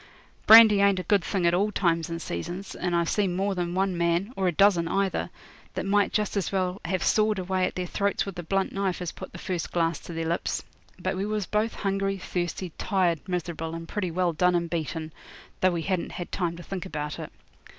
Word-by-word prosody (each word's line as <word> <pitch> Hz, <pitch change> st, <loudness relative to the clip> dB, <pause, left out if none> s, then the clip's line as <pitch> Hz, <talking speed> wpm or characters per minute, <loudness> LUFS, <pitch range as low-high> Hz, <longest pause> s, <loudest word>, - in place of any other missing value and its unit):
Brandy 220 Hz, -2 st, +9 dB
ain't 200 Hz, -1 st, +4 dB
a 185 Hz, -, -2 dB
good 195 Hz, +1 st, +2 dB
thing 185 Hz, 0 st, -1 dB
at 170 Hz, -, +4 dB
all 200 Hz, +4 st, +2 dB
times 170 Hz, -5 st, +1 dB
and 165 Hz, 0 st, -4 dB
seasons, 175 Hz, -, -5 dB
and 180 Hz, -1 st, -2 dB
I've 170 Hz, -1 st, +2 dB
seen 195 Hz, -3 st, +1 dB
more 195 Hz, +2 st, 0 dB
than 175 Hz, -1 st, -2 dB
one 190 Hz, -1 st, +1 dB
man, 170 Hz, +6 st, 0 dB
or 190 Hz, -1 st, 0 dB
a -, -, +3 dB
dozen 175 Hz, -1 st, +4 dB
either, 190 Hz, -, 0 dB, 0.5 s
that -, -, -2 dB
might 200 Hz, +1 st, +2 dB
just 210 Hz, -1 st, 0 dB
as 200 Hz, -, -1 dB
well 185 Hz, -1 st, -1 dB
have 185 Hz, -2 st, -1 dB
sawed 215 Hz, -1 st, +3 dB
away 185 Hz, 0 st, 0 dB
at -, -, -7 dB
their 180 Hz, -, -2 dB
throats 200 Hz, +3 st, 0 dB
with 195 Hz, -3 st, -6 dB
a -, -, -1 dB
blunt 195 Hz, +3 st, 0 dB
knife 195 Hz, -2 st, -1 dB
as 180 Hz, -2 st, -3 dB
put -, -, -9 dB
the -, -, -9 dB
first 180 Hz, -3 st, -3 dB
glass 165 Hz, -2 st, +1 dB
to 170 Hz, -, -9 dB
their 165 Hz, 0 st, -3 dB
lips. 170 Hz, +1 st, -1 dB, 0.3 s
But -, -, -2 dB
we 190 Hz, +2 st, -2 dB
was 210 Hz, -2 st, -1 dB
both 215 Hz, +3 st, 0 dB
hungry, 195 Hz, 0 st, -1 dB
thirsty, 175 Hz, 0 st, -3 dB
tired, 180 Hz, -5 st, +1 dB
miserable, 170 Hz, -2 st, -3 dB
and 165 Hz, 0 st, -7 dB
pretty 185 Hz, -1 st, -2 dB
well 175 Hz, 0 st, 0 dB
done 180 Hz, +2 st, +3 dB
and 170 Hz, -1 st, 0 dB
beaten, 160 Hz, -1 st, -3 dB, 0.5 s
though 185 Hz, -, +4 dB
we 165 Hz, -1 st, -2 dB
hadn't 185 Hz, -1 st, -2 dB
had 175 Hz, -, -6 dB
time 170 Hz, -3 st, -2 dB
to 175 Hz, -, -9 dB
think 190 Hz, -2 st, -5 dB
about 150 Hz, -1 st, -4 dB
it. -, -, -7 dB
180 Hz, 225 wpm, -27 LUFS, 170-195 Hz, 0.5 s, Brandy